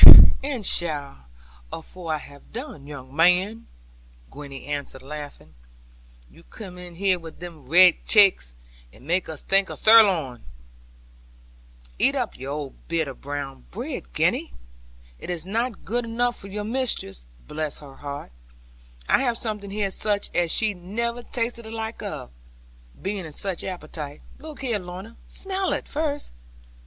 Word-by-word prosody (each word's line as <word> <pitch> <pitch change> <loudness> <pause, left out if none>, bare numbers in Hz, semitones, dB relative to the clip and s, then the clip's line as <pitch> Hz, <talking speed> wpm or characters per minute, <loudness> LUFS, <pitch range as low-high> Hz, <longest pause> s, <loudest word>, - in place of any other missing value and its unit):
'And 265 -7 -2
shall, 145 - +1 0.4
afore 165 +1 -6
I 155 - +1
have 140 -1 -14
done, 225 - -7
young 135 -2 -9
man,' 180 +7 +3 0.6
Gwenny 140 -2 -9
answered 145 -2 -4
laughing; 145 - -8 0.7
'you 165 - -18
come 180 0 -10
in 175 -1 -9
here 190 0 +3
with 165 -1 -11
they 175 +1 -6
red 170 +3 +5
chakes, 195 - +6 0.4
and 125 - -17
make 175 +3 +1
us 155 -2 -6
think 195 0 +3
o' - - -5
sirloin.' 190 - +5 1.6
'Eat - - +4
up - - -1
your 140 +1 -5 0.2
bit 165 -2 0
of 135 - -8
brown 140 - -5
bread, - - -6
Gwenny. - - +1 0.6
It - - -8
is 175 -2 -2
not 230 +3 -2
good 240 +4 -1
enough 240 +1 0
for 195 - -8
your 205 +1 -4
mistress. 220 - 0 0.2
Bless 155 -1 -3
her 140 -2 -12
heart, 140 - -7 0.8
I - - +5
have 245 -3 +1
something 210 -3 -2
here 200 -1 -1
such 205 0 0
as 175 -1 +2
she 215 -1 +3
never 230 +7 -2
tasted 235 -1 -3
the - - -8
like 225 0 -4
of, - - -6 0.7
being 195 -1 -3
in 155 -2 -8
such 190 +1 -2
appetite. 155 -5 -6 0.2
Look 310 -2 -9
here, 235 -6 0
Lorna; 185 +5 -9
smell 385 0 -1
it - - -3
first. 295 -1 -2
180 Hz, 145 wpm, -25 LUFS, 145-220 Hz, 1.6 s, chakes